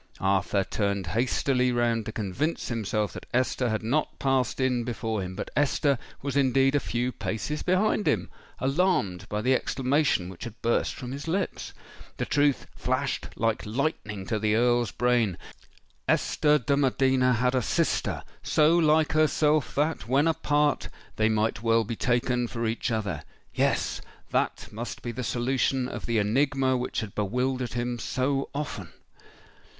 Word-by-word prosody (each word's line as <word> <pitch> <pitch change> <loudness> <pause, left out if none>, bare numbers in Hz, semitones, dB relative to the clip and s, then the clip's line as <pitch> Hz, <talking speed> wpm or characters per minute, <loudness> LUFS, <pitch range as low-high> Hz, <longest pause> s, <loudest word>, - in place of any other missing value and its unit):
Arthur 95 +1 +2
turned 100 -1 -1
hastily 125 +2 +1
round 120 -2 +1
to - - -3
convince 110 - -2
himself 110 -3 -1
that - - -9
Esther 125 -1 +1
had 110 0 -1
not 140 +8 0
passed 135 -2 0
in 125 -2 +1
before 115 -3 -2
him: 95 0 -5
but - - -5
Esther 145 -2 +2 0.2
was 140 -1 -3
indeed 135 0 +3
a 145 - +3
few 125 -1 -2
paces 150 +6 -3
behind 185 +1 +1
him—alarmed 135 - -1
by 105 0 -1
the 130 +2 +3
exclamation 135 - +1
which 90 -1 -9
had 115 -1 -9
burst 115 0 +1
from 125 -2 -7
his 140 +4 -6
lips. 185 +3 -2 0.5
The - - -1
truth 145 -1 +2
flashed - - -1
like 115 -1 0
lightning 105 -5 -2
to 110 +2 -1
the 105 0 +2
Earl's 120 -1 +3
brain:—Esther 125 - 0
de 140 +1 0
Medina 130 -2 +3
had 125 +2 +1
a 130 - +2
sister—so 155 +7 +1
like 155 -2 +4
herself 155 -1 +2
that, 150 -5 0
when 140 +5 +3
apart, 150 -2 +1 0.3
they 110 0 +3
might 110 -1 0
well 115 0 +3
be 115 +2 -4
taken 120 +1 +1
for 115 0 -3
each 115 +3 -1
other:—yes—that 100 -10 -2
must 115 +3 -6
be 120 - -3
the 125 +2 -5
solution 125 +3 0
of - - -6
the 115 -1 +1
enigma 130 +5 +2
which 125 0 -2
had 110 -3 -6
bewildered 125 +4 -1
him 120 0 -2
so 135 +3 -1
often! 130 - -4
125 Hz, 145 wpm, -27 LUFS, 110-140 Hz, 0.5 s, like